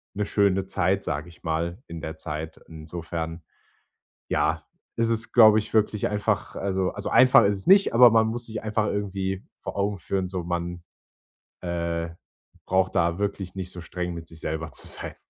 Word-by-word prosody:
'ne 105 +1 -1
schöne 100 -2 +2
Zeit, 95 +1 0
sage 75 +4 -3
ich 85 - -18
mal 85 +5 -2
in 85 -1 -7
der 80 +1 -6
Zeit. 80 +1 -6
Insofern, 80 +1 -6 0.9
ja, - - +1 0.3
ist 115 0 +1
es, 115 0 -2
glaube 110 -3 +8
ich, 105 - -4
wirklich 105 -1 +2
einfach 105 0 -1
also 95 -1 0
also, - - -4
einfach 130 0 +7
ist 100 0 +2
es 95 - -13
nicht, 195 +1 +6
aber 120 0 +9
man 110 0 +4
muss 120 +1 -4
sich 110 -1 -6
einfach 110 0 0
irgendwie 95 -2 -2
vor - - -7
Augen 100 0 0
führen, 95 +3 -2
so 90 -2 -4
man, 85 0 -3 0.8
äh, 85 -1 -2 0.6
braucht 95 0 +1
da 85 0 +2
wirklich 100 -2 -3
nicht 95 -1 -5
so 90 - -8
streng 90 +1 -4
mit 85 -1 -8
sich 80 -1 -13
selber 80 0 -3
zu - - -5
sein. - - -6
95 Hz, 180 wpm, -25 LUFS, 85-105 Hz, 0.9 s, aber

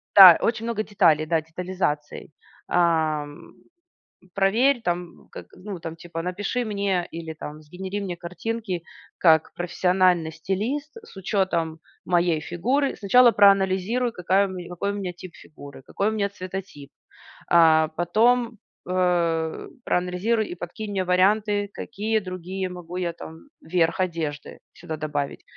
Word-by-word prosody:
да, 185 -4 +11
очень 230 -1 0
много 230 -2 -1
деталей, 170 -8 +3
да, 160 0 +1
детализации. 160 -2 -4 0.4
Ам. 155 -4 0 0.8
Проверь 235 +7 +3
там, 175 -2 -4
как - - -10 0.2
ну, 200 -4 -5
там, 165 0 -7
типа, 165 0 -7
напиши 200 +8 -2
мне 200 -5 -1
или 165 -1 -6
там 155 -1 -8
сгенери 185 +6 -6
мне 190 -3 -4
картинки 185 +2 -4 0.3
как 160 -2 +4
профессиональный 180 -1 +2
стилист 220 - -3
с 320 - -15
учётом 180 -5 -1 0.3
моей 175 -2 +2
фигуры. 255 - 0
Сначала 240 +4 +5
проанализируй, 200 +4 +3
какая 190 0 +2
у - - -8
меня, 180 -2 -7
какой 180 +3 -2
у - - -5
меня 195 -3 -4
тип 185 0 -10
фигуры, 145 -3 -13
какой 200 - -1
у - - -2
меня 205 -2 -1
цветотип, 185 -6 -8 0.6
э, 160 -2 +6
потом, 230 +6 +2 0.3
э, 170 -3 0 0.2
проанализируй 185 +5 0
и - - -5
подкинь 205 +5 -7
мне 195 -2 -1
варианты, 205 +3 +2
какие 220 0 -2
другие 185 0 -5
могу 180 -1 -8
я 175 -2 -2
там 160 -1 -10 0.2
верх 165 +2 0
одежды 160 -5 -3 0.2
сюда 160 -2 -7
добавить. 145 -2 -4
180 Hz, 135 wpm, -24 LUFS, 165-205 Hz, 0.8 s, да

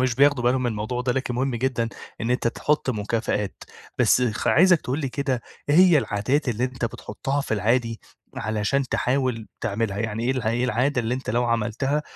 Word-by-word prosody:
مش 130 -2 +1
بياخدوا 140 -1 +3
بالهم 125 +1 +2
من 120 - 0
الموضوع 110 +3 -3
ده 125 0 0
لكن 125 -1 -2
مهم 130 +1 0
جدًا، 120 -1 0 0.3
إن 115 - -1
أنت 125 -1 +1
تحط 150 +2 0
مكافآت، 105 -2 -2 0.3
بس 125 - +4
خ 115 -4 -1
عايزك 180 -1 +5
تقول 130 +3 -2
لي 140 - -1
كده، 130 -2 -2 0.3
إيه 145 - +3
هي 180 -3 +7
العادات 130 +5 0
اللي 120 +1 0
أنت 125 -1 -3
بتحطها 125 +5 -3
في 125 - -1
العادي 115 +2 0 0.4
علشان 110 +6 0
تحاول 125 -4 0
تعملها، 100 -1 -2
يعني 110 +1 -2
إيه 125 - +2
ال 130 -2 -1
إيه 115 +3 0
العادة 125 +2 +1
اللي 120 +1 -1
أنت 130 - -4
لو 120 +1 +1
عملتها، 120 +5 0
125 Hz, 195 wpm, -24 LUFS, 115-135 Hz, 0.4 s, هي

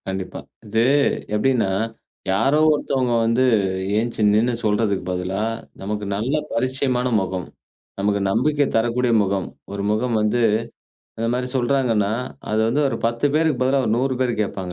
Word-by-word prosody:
கண்டிப்பா. 95 -1 -4 0.3
இது 110 +2 +1 0.5
எப்டின்னா 115 -3 +1 0.6
யாரோ 135 +10 +2
ஒருத்தவங்க 135 -4 0
வந்து 115 +3 +2 0.5
எந்திச்சி 115 0 -1
நின்னு 115 +4 +2
சொல்றதுக்கு 105 -2 +1
பதிலா, 90 +2 -2 0.4
நமக்கு 105 +1 -3
நல்ல 115 +7 -1 0.2
பரிச்சயமான 130 0 0
முகம், 95 -1 -4 0.5
நமக்கு 100 0 +1
நம்பிக்கை 145 +5 +2
தரக்கூடிய 120 +2 +1
முகம், 95 -1 -1 0.3
ஒரு 100 0 -3
முகம் 115 +2 0
வந்து 110 +3 +1 0.8
இந்த 115 0 -1
மாரி 125 0 -2
சொல்றாங்கன்னா 120 -5 +1 0.4
அது 110 0 +1
வந்து 140 +6 +1
ஒரு 120 - -2
10 115 +4 0
பேருக்கு 155 -4 +2
பதிலா 135 +1 +2
ஒரு 110 - +1
100 130 +2 0
பேர் 125 -4 0
கேட்பாங்க 95 -3 -4
115 Hz, 140 wpm, -21 LUFS, 105-130 Hz, 0.8 s, யாரோ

